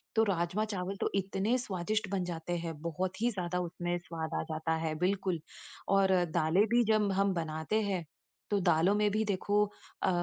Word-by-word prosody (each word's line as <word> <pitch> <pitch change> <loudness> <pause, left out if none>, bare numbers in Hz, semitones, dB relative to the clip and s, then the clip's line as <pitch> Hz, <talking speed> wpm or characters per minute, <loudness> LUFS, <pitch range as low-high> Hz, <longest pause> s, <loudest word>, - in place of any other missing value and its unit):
तो 220 - +5
राजमा-चावल 195 +1 -1
तो - - +2
इतने 195 +5 +1
स्वादिष्ट 210 -2 -2
बन 190 -2 0
जाते 175 0 -3
हैं, 165 -1 -4
बहुत 180 +5 -3
ही 240 - +3
ज़्यादा 180 -2 -2
उसमें 175 0 -2
स्वाद 165 -2 -5
आ - - -1
जाता 160 +1 0
है, 160 -1 -1
बिल्कुल। 185 -2 +1 0.6
और 190 -1 +4 0.2
दालें 170 +4 +4
भी 240 - +6
जब 210 -2 +3
हम 195 0 +2
बनाते 160 +6 -1
हैं, 190 -5 -1 0.5
तो 205 - +3
दालों 175 +3 +3
में 210 0 +3
भी 215 +2 +1
देखो 205 +1 +2 0.4
अ, - - +3
185 Hz, 175 wpm, -32 LUFS, 170-205 Hz, 0.6 s, भी